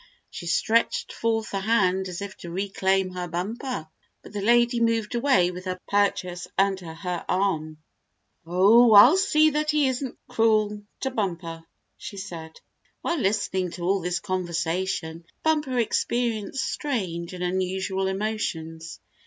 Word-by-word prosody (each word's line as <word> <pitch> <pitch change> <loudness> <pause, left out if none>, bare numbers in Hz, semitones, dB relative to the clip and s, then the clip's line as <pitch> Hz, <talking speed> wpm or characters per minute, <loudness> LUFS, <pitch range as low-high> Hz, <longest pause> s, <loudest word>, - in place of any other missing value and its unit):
She 170 - -7
stretched 225 +7 +1
forth 225 -2 -1
a 195 - 0
hand 190 -3 +2
as 180 +2 -5
if 200 -1 -7
to 170 - -9
reclaim 190 0 0
her 180 -1 -4
Bumper, 195 - -4 0.4
but - - -13
the 205 - -3
lady 235 +2 +3
moved 230 -1 +1
away 235 -8 +3
with 180 +1 -9
her 185 0 -3
purchase 180 -3 0
under 190 -3 +1
her 175 +1 -4
arm. 160 -5 0 0.7
"Oh, 205 +7 +5
I'll 225 - +9
see 310 -5 +4
that 300 +1 -1
he 300 -2 +3
isn't 260 0 -4
cruel 215 -3 +2 0.2
to 265 - -1
Bumper," 170 -7 -3 0.4
she 200 - -8
said. 165 -4 -8 0.4
While 340 -2 0
listening 190 -4 0
to 175 - -7
all 190 +2 +1
this 175 +1 -1
conversation, 175 -2 -2 0.2
Bumper 300 -5 +1
experienced 235 +1 0
strange 185 - -3
and 180 - -5
unusual 190 +1 -1
emotions. 165 -6 -3
195 Hz, 140 wpm, -25 LUFS, 180-230 Hz, 0.7 s, I'll